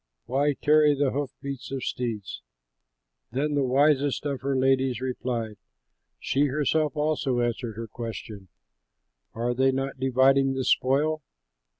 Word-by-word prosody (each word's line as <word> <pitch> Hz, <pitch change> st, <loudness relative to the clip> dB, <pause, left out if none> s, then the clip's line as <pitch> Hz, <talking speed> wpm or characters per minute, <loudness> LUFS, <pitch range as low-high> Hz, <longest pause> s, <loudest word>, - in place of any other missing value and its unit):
Why 140 Hz, +4 st, +1 dB
tarry 150 Hz, 0 st, +4 dB
the 140 Hz, -1 st, +1 dB
hoof 140 Hz, 0 st, -2 dB
beats 140 Hz, -1 st, -6 dB
of 135 Hz, -2 st, -3 dB
steeds?' 110 Hz, -, -4 dB, 0.9 s
Then 145 Hz, +4 st, -1 dB
the 145 Hz, -1 st, +2 dB
wisest 140 Hz, +2 st, +2 dB
of 140 Hz, -2 st, -2 dB
her 135 Hz, +1 st, -1 dB
ladies 130 Hz, -1 st, +2 dB
replied, 120 Hz, -4 st, -3 dB, 0.6 s
She 140 Hz, +2 st, +1 dB
herself 150 Hz, +2 st, 0 dB
also 150 Hz, -4 st, 0 dB
answered 120 Hz, -1 st, -2 dB
her 115 Hz, +1 st, -5 dB
question, 110 Hz, -3 st, -7 dB, 0.9 s
'Are 120 Hz, +2 st, -1 dB
they 130 Hz, +2 st, +3 dB
not 135 Hz, 0 st, -3 dB
dividing 135 Hz, +1 st, +3 dB
the 130 Hz, -, -1 dB
spoil? 150 Hz, +6 st, +2 dB
135 Hz, 130 wpm, -26 LUFS, 125-145 Hz, 0.9 s, tarry